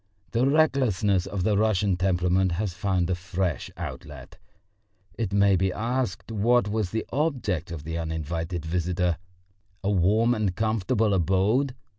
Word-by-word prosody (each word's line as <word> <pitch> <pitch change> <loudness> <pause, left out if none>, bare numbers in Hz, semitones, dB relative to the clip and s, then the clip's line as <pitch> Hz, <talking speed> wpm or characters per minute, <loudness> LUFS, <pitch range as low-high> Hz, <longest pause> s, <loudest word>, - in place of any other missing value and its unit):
The 120 +3 +2
recklessness 120 - +2
of 95 -2 -3
the 105 +2 +2
Russian 105 -2 +2
temperament 90 0 +1
has 95 +1 -2
found 95 -2 0
a - - +3
fresh 90 -3 -2
outlet. 75 +4 -8 0.7
It 110 -4 -3
may 100 -1 +4
be 95 +1 +1
asked 120 +3 -2
what 115 +2 +2
was 105 -2 -1
the 110 +2 -3
object 125 - -1
of 85 -3 -6
the 80 +1 -4
uninvited 80 +1 -3
visitor? 90 +1 0 0.7
A 100 - +1
warm 105 +6 +3
and 105 -6 -1
comfortable 110 0 +1
abode? 95 - +2
95 Hz, 140 wpm, -26 LUFS, 90-110 Hz, 0.7 s, may